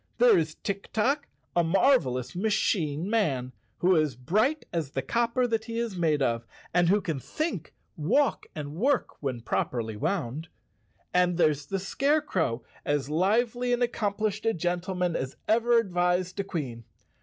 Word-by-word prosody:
There 245 0 +6
is 155 -2 0
Tik 200 -1 -5
Tok, 275 +7 +1 0.3
a 175 - +4
marvelous 165 - +2
machine 180 -6 0
man 145 - 0 0.3
who 185 +1 +3
is 155 -6 +2
bright 215 - +1
as 165 -5 -1
the 135 -1 -3
copper 235 - +1
that 225 -2 -1
he 230 0 -5
is 230 -4 -2
made 155 -5 +2
of, 115 -2 -1 0.3
and 175 -1 +4
who 205 +2 +4
can 160 -7 -2
think, 310 - -4 0.2
walk 205 - +1
and 145 -2 -5
work 255 - 0
when 130 -5 -3
properly 115 -1 -2
wound. 155 - -2 0.7
And 180 -1 +3
there's 150 -4 +2
the 195 - -1
Scare¬ 280 +10 +1
crow, 125 - -1 0.2
as 145 -1 -1
lively 235 +8 +2
and 245 0 +2
accomplished 215 -2 -1
a 225 - +2
gentleman 180 +1 -1
as 130 0 -3
ever 235 +2 +4
advised 180 -2 +1
a - - +1
Queen. 140 -12 -5
180 Hz, 155 wpm, -28 LUFS, 150-225 Hz, 0.7 s, There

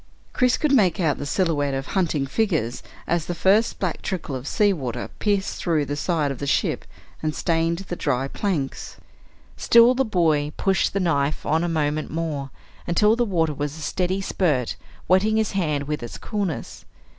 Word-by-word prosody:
Chris 250 -1 +3
could 300 - +1
make 200 - +4
out 160 -5 +1
the 145 - -4
silhouette 145 -6 0
of 135 0 -3
hunting 165 -7 +1
figures 150 - -1 0.2
as 170 -1 -1
the 175 - -2
first 205 +6 +3
black 180 -4 -2
trickle 180 -7 -4
of 130 +2 -6
sea 205 +4 +3
water 125 -7 -4
pierced 200 -2 0
through 160 -4 +1
the 145 - -3
side 150 -1 0
of 135 - -6
the 140 - -4
ship - - 0 0.4
and 155 -1 -2
stained 165 -1 +1
the 175 - -3
dry 135 -5 -1
planks. 155 -4 -3 0.6
Still 235 +1 +6
the 265 +1 +1
boy 160 - +1
pushed 195 -1 +1
the 200 - 0
knife 150 -5 0
on 160 +2 +1
a 175 - 0
moment 155 -1 -1
more 155 -4 -3 0.4
until 210 +6 +4
the 240 - +1
water 165 -7 +1
was 145 +1 -4
a - - -9
steady 185 +4 -1
spurt, 150 -11 0 0.3
wetting 205 +4 +3
his 220 -2 +1
hand 155 -7 0
with 150 0 -2
its 120 - -7
coolness. 190 - -4
165 Hz, 180 wpm, -23 LUFS, 145-195 Hz, 0.6 s, Still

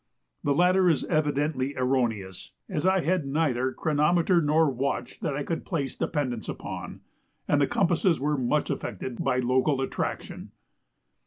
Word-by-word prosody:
The 140 -1 +1
latter 180 +2 +4
is 160 - +2
evidently 145 -3 0
erroneous, 115 -8 -1
as 175 -2 -1
I 190 0 +3
had 170 -4 0
neither 135 -3 0
chronometer 165 +5 +2
nor 155 +1 +3
watch 130 -2 -2
that 140 - -2
I 145 - -2
could 165 +3 -3
place 140 -7 -2
dependence 130 -7 -2
upon, - - -6 0.5
and 145 -1 +3
the 140 - +3
compasses 175 -2 +2
were 150 +2 0
much 135 +3 0
affected 125 -3 -4
by 125 - +1
local 130 +3 +2
attraction. 135 - -4
145 Hz, 145 wpm, -27 LUFS, 130-165 Hz, 0.5 s, latter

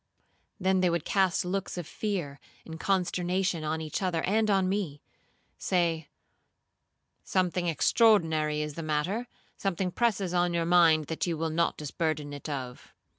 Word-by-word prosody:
Then 190 0 +2
they 185 -1 +3
would 170 -2 -1
cast 190 -3 +2
looks 190 +1 -3
of 175 - -4
fear 170 -8 -3 0.3
and 160 0 -8
consternation 180 -2 0
on 155 +1 -2
each 155 +3 -4
other 180 -4 0
and 215 +2 +2
on 195 -2 +3
me; 185 -7 -2 0.6
say, 165 -4 0 1.1
'Something 180 -1 0
extraordinary 160 -5 +3
is 150 -1 -5
the 165 - -6
matter,—something 180 +3 -3
presses 200 -5 0
on 175 -1 +1
your 170 -1 +1
mind 165 -3 +5
that 160 +4 -3
you 170 -2 -1
will 160 0 -1
not 170 +1 +1
disburden 150 -1 -2
it 145 +2 -7
of.' 130 -4 -6
175 Hz, 145 wpm, -28 LUFS, 155-190 Hz, 1.1 s, mind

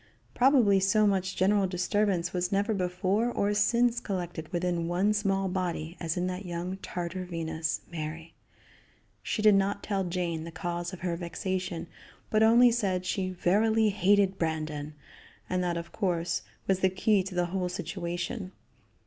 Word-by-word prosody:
Probably 245 -7 +5
so 210 +3 +3
much 195 -1 +1
general 195 +1 +3
disturbance 185 0 0
was 180 0 -1
never 200 +3 +1
before 190 +4 0
or 205 -2 0
since 235 +3 +3
collected 175 -7 -5
within 175 -1 -1
one 185 +5 +2
small 195 -2 0
body 175 -3 -3
as 165 0 -2
in 180 - 0
that 185 +2 -3
young 180 +1 -4
Tartar 180 -1 -4
Venus, 160 -2 -3
Mary. 160 0 -6 0.9
She 215 - -2
did 215 -1 +7
not 195 +1 +1
tell 195 -2 -1
Jane 175 -3 -2
the 165 - -7
cause 175 +1 -4
of 185 - -9
her 175 -2 -1
vexation, 180 0 -3 0.5
but 215 - +3
only 235 +2 +7
said 190 -6 0
she 185 0 -1
"verily 215 +5 +2
hated 195 0 +3
Brandon," 155 -2 -3 0.5
and 185 0 0
that, 175 -1 -1
of 170 0 -6
course, 175 -5 -1 0.3
was 190 -1 +2
the 190 - +3
key 195 +2 +2
to 185 0 -6
the 175 0 +2
whole 185 -2 -1
situation. 180 +2 -4
185 Hz, 155 wpm, -29 LUFS, 175-200 Hz, 0.9 s, did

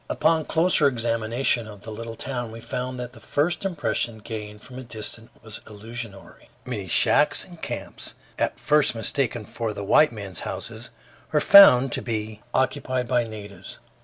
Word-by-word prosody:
Upon 160 0 +2
closer 165 -1 +4
examination 115 0 0
of 105 -2 -11
the 110 - -8
little 115 +1 -6
town 120 -2 -4
we 115 - -9
found 125 +2 -4
that 125 0 -6
the - - -13
first 170 +7 0
impression, 145 -10 -1
gained 105 -1 -7
from 130 -1 -10
a - - -7
distance, 115 -1 -6
was 110 -1 -8
illusory. 110 -1 -9 0.2
Many - - -4
shacks - - +2
and - - -14
camps, - - -6 0.2
at - - -1
first 150 -4 +2
mistaken 115 0 -1
for 110 +1 -4
the 100 - -5
white 150 +9 +5
men's 100 -4 -7
houses, - - -6 0.4
were 150 - +3
found 135 -8 +8
to - - -2
be 110 -2 -4
occupied 130 -1 0
by 120 -1 +2
natives. 105 -4 -9
115 Hz, 160 wpm, -24 LUFS, 110-130 Hz, 0.4 s, found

